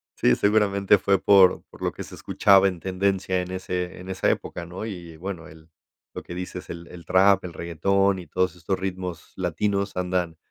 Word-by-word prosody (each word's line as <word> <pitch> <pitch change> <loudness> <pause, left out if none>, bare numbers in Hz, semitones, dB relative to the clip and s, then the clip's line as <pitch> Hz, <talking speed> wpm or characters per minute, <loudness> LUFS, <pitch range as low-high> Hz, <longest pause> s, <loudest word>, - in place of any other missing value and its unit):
Sí, 60 - +3
seguramente 100 -1 +3
fue 95 0 +2
por 95 -2 +5
por - - -16
lo - - 0
que - - -8
se - - -11
escuchaba 100 -1 +4
en 90 -3 -3
tendencia 95 0 0
en 90 0 -6
ese 90 -1 -4
en 90 - -10
esa 95 0 0
época, 85 - -3
¿no? 90 +5 -7
Y 85 -6 -8
bueno, 90 -1 -6
el 80 +1 -16 0.4
lo - - -7
que 85 - -8
dices 90 0 -6
el 85 0 -8
el 85 -1 -12
trap, 95 +1 +4
el 90 - -7
reguetón 95 +4 +1
y 90 - -10
todos 90 +3 0
estos 90 +2 -3
ritmos 90 -2 -5
latinos 100 +3 -1
andan 90 -2 -1
95 Hz, 195 wpm, -24 LUFS, 90-100 Hz, 0.4 s, por